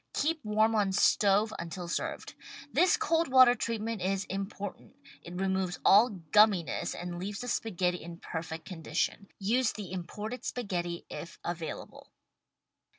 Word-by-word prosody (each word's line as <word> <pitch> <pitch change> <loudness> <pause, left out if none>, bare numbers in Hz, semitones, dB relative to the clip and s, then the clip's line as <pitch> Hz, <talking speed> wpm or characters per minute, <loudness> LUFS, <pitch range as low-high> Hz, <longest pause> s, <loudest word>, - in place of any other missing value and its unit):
Keep 315 +1 0
warm 215 +1 +2
on 205 -3 +2
stove 205 +2 +3
until 170 +1 -5
served. 170 - -3 0.4
This 355 +5 +4
cold 330 +1 +1
water 255 -2 +7
treatment 230 -3 -3
is 190 +1 0
important. 195 +1 -6 0.3
It 180 +1 -8
removes 190 -2 0
all 215 +5 +7
gumminess 195 -1 +2
and 175 0 -5
leaves 195 +2 -4
the 245 - -5
spaghetti 180 -7 -1
in 170 +1 -8
perfect 160 -1 -6
condition. 175 +3 -2
Use 225 +4 +1
the 205 -4 -7
imported 210 +6 -5
spaghetti 175 -7 -3
if 170 - -7
available. 170 -2 -6
195 Hz, 135 wpm, -30 LUFS, 175-220 Hz, 0.4 s, water